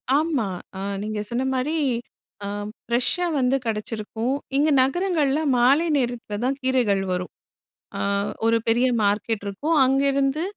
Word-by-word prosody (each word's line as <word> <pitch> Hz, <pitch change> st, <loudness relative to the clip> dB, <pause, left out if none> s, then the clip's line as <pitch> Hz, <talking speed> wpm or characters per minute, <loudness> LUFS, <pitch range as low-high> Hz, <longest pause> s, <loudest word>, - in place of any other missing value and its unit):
ஆமா. 300 Hz, -7 st, +1 dB, 0.3 s
அ -, -, -5 dB, 0.2 s
நீங்க 215 Hz, 0 st, -3 dB
சொன்னமாரி 260 Hz, +4 st, -1 dB, 0.7 s
ஆ -, -, -3 dB, 0.4 s
ஃப்ரெஷ்ஷா 250 Hz, +9 st, 0 dB
வந்து 255 Hz, +1 st, +2 dB
கிடைச்சிருக்கும். 225 Hz, +3 st, -2 dB, 0.2 s
இங்கே 300 Hz, +1 st, +3 dB
நகரங்கள்ல 305 Hz, 0 st, +1 dB, 0.2 s
மாலை 275 Hz, +7 st, +4 dB
நேரத்தில 240 Hz, -5 st, -2 dB
தான் 270 Hz, +2 st, 0 dB
கீரைகள் 245 Hz, -7 st, +2 dB
வரும். 180 Hz, 0 st, -2 dB, 0.7 s
ஆ -, -, -4 dB, 0.5 s
ஒரு 230 Hz, 0 st, +4 dB
பெரிய 240 Hz, +3 st, +3 dB, 0.2 s
மார்க்கெட் 205 Hz, +1 st, 0 dB
இருக்கும். 290 Hz, +12 st, -1 dB
அங்கிருந்து 275 Hz, +2 st, +2 dB
255 Hz, 120 wpm, -23 LUFS, 225-280 Hz, 0.7 s, மாலை